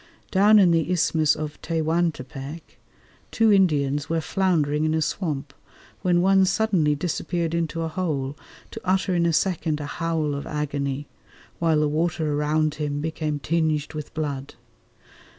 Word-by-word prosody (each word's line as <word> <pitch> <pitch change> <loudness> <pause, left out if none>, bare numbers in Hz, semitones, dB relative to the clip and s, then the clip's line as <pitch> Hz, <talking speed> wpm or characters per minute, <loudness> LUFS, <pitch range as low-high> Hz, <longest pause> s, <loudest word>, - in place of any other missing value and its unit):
Down 205 +3 +6
in 185 -4 +6
the 165 0 +1
Isthmus 160 -3 +2
of 155 -1 -6
Tehuantepec 160 -3 -3 0.5
two 225 -2 +3
Indians 145 -7 +2
were 165 0 +1
floundering 155 -5 +1
in 155 0 +1
a 160 - +1
swamp 150 -7 -3 0.5
when 175 -1 +2
one 195 0 +5
suddenly 185 -7 +2
disappeared 170 +1 -2
into 165 0 -1
a - - -1
hole, 150 -5 -2 0.4
to - - -8
utter 190 0 +1
in 170 -1 +2
a - - +2
second 160 -3 0
a 145 - -4
howl 160 -1 -1
of 140 0 -5
agony, 145 -1 -2 0.5
while 165 -2 +2
the 150 - +2
water 155 0 0
around 150 +1 +1
him 145 -1 -1
became 155 -1 -2
tinged 155 +1 -1
with 150 -1 -6
blood. 145 -3 -4
155 Hz, 150 wpm, -24 LUFS, 150-175 Hz, 0.5 s, Down